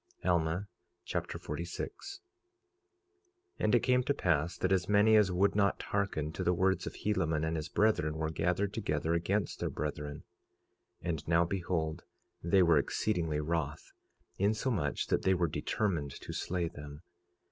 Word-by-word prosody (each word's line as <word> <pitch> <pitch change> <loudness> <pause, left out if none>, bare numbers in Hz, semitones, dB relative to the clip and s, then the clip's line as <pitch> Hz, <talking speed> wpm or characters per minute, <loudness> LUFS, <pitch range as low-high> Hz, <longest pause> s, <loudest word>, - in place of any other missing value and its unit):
Alma 85 +2 +1 0.4
Chapter - - -3
46 235 - -6 1.4
46:1 - - -5
And 110 - +4
it 120 - +4
came 125 -1 +4
to 140 +3 0
pass 85 0 +1
that 95 - 0
as 95 -1 +2
many 105 +2 +5
as 105 -3 +5
would 95 +3 +3
not 100 -1 +2
hearken 95 -7 -1
to - - -4
the 90 - +2
words 95 0 +1
of - - -6
Helaman 80 -7 0
and 80 +1 -1
his 80 0 -4
brethren 80 -8 +2
were 80 0 -1
gathered 90 +5 0
together 80 -6 -1
against 95 +4 0
their - - -1
brethren. 75 -1 -4 0.8
46:2 - - -3
And 80 -2 -3
now 85 +1 +4
behold, 85 -3 -2 0.4
they 90 +3 +4
were 85 -3 +5
exceedingly 80 -2 -1
wroth, 75 -1 -3 0.5
insomuch 100 - 0
that - - +1
they 95 0 +3
were 90 -1 +1
determined 75 0 -2
to - - -7
slay 90 -1 -1
them. 75 0 -10
85 Hz, 160 wpm, -32 LUFS, 80-100 Hz, 1.4 s, many